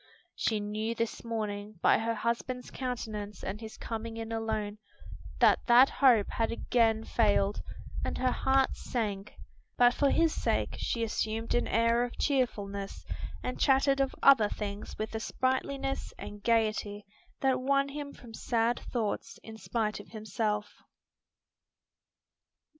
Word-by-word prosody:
She 220 -2 0
knew 215 +2 -2
this 230 0 -3
morning, 215 -2 -4
by - - +4
her 230 +1 -1
husband's 235 +3 -2
countenance 215 -5 -5
and 200 +4 -4
his 220 -1 -8
coming 225 0 -5
in 225 0 -5
alone, 220 -2 -2 0.6
that - - +5
that 245 +2 +7
hope 245 -7 +5
had 225 - 0
again 225 -2 +2
failed, 205 -3 +2 0.4
and - - -2
her 255 0 +1
heart 265 +1 +2
sank; 210 -4 -3 0.4
but 245 0 +6
for 280 +1 +2
his 330 +1 +3
sake - - 0
she 230 - -1
assumed 220 0 -1
an 240 - +1
air 230 +2 +3
of 245 - -5
cheerfulness 205 -8 -1 0.4
and 250 - -3
chatted 275 0 +4
of 270 - 0
other 245 -7 +7
things 205 -1 -5
with 215 +1 -4
a 220 - -2
sprightliness 270 +3 -2
and 205 0 -8
gayety 215 -2 0 0.4
that 265 -2 +2
won 275 +1 +2
him 285 0 -6
from 235 -4 -13
sad 235 +1 0
thoughts 230 -1 -2
in 220 - -9
spite 220 -1 -2
of 205 - -11
himself. 210 -1 -3
225 Hz, 140 wpm, -30 LUFS, 215-250 Hz, 0.6 s, that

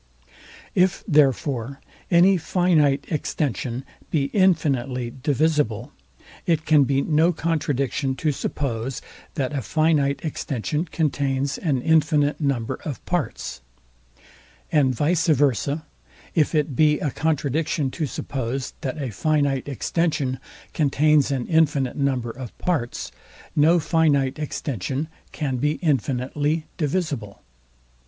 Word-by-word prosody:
If 185 0 +2
therefore 140 - +2 0.3
any 180 +3 +6
finite 160 -5 +2
extension 130 - -2 0.2
be 140 -3 0
infinitely 135 - +1
divisible, 145 -4 +1 0.6
it 160 -2 +1
can 150 -3 +5
be 135 +1 +1
no 160 +2 +3
contradiction 145 -5 -1
to 150 +4 0
suppose, 130 -3 -3 0.3
that 135 0 -1
a 140 - -1
finite 150 - +1
extension 150 +1 -2
contains 140 -4 -1
an 140 -7 0
infinite 155 -2 +2
number 135 -6 -1
of 140 -7 -6
parts: 175 - -3 1.1
And 135 -4 +3
vice 160 +6 +1
versa, 145 0 +2 0.5
if 155 0 +2
it 150 -3 +1
be 150 +2 +4
a 145 - -1
contradiction 150 -1 0
to 155 0 -2
suppose, 130 0 -4
that 140 +3 -3
a 135 -5 -3
finite 140 +3 0
extension 140 -1 -1 0.3
contains 150 0 +3
an 135 -3 -1
infinite 150 -6 +2
number 130 -5 0
of 125 -1 -9
parts, 145 -10 -2 0.4
no 160 +4 +5
finite 150 -4 +2
extension 140 - -3 0.2
can 135 -5 -2
be 150 +4 +1
infinitely 145 - 0
divisible. 145 - -2
145 Hz, 110 wpm, -23 LUFS, 130-155 Hz, 1.1 s, any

